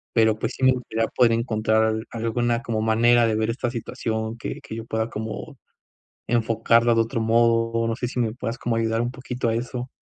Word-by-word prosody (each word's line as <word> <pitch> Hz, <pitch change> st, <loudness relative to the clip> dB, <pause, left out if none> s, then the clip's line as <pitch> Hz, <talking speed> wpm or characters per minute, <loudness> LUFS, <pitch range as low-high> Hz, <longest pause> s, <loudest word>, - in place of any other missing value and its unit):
Pero 110 Hz, -1 st, +4 dB
pues -, -, -3 dB
sí 130 Hz, -, -1 dB
me 130 Hz, -, +7 dB
gustaría 115 Hz, -3 st, -2 dB
poder 120 Hz, -2 st, +3 dB
encontrar 110 Hz, -1 st, +1 dB
al 110 Hz, 0 st, -1 dB
alguna 115 Hz, +1 st, -1 dB
como 115 Hz, -4 st, -2 dB
manera 115 Hz, +2 st, +4 dB
de 110 Hz, -, +1 dB
ver 110 Hz, +1 st, 0 dB
esta 120 Hz, 0 st, -2 dB
situación 110 Hz, -1 st, -3 dB
que -, -, -5 dB
que -, -, -8 dB
yo 115 Hz, 0 st, -6 dB
pueda 110 Hz, 0 st, -2 dB
como 110 Hz, -1 st, -6 dB, 0.7 s
enfocarla 115 Hz, 0 st, +3 dB
de 115 Hz, -, +3 dB
otro 115 Hz, 0 st, -2 dB
modo, 115 Hz, 0 st, +2 dB
no 115 Hz, -, -1 dB
sé 125 Hz, -, -3 dB
si 125 Hz, -, -4 dB
me 110 Hz, -2 st, 0 dB
puedas 120 Hz, -1 st, -4 dB
como 115 Hz, -1 st, -1 dB
ayudar 115 Hz, 0 st, 0 dB
un 120 Hz, +1 st, -2 dB
poquito 125 Hz, -2 st, -3 dB
a 115 Hz, -, 0 dB
eso. 125 Hz, +1 st, -4 dB
115 Hz, 210 wpm, -24 LUFS, 110-120 Hz, 0.7 s, me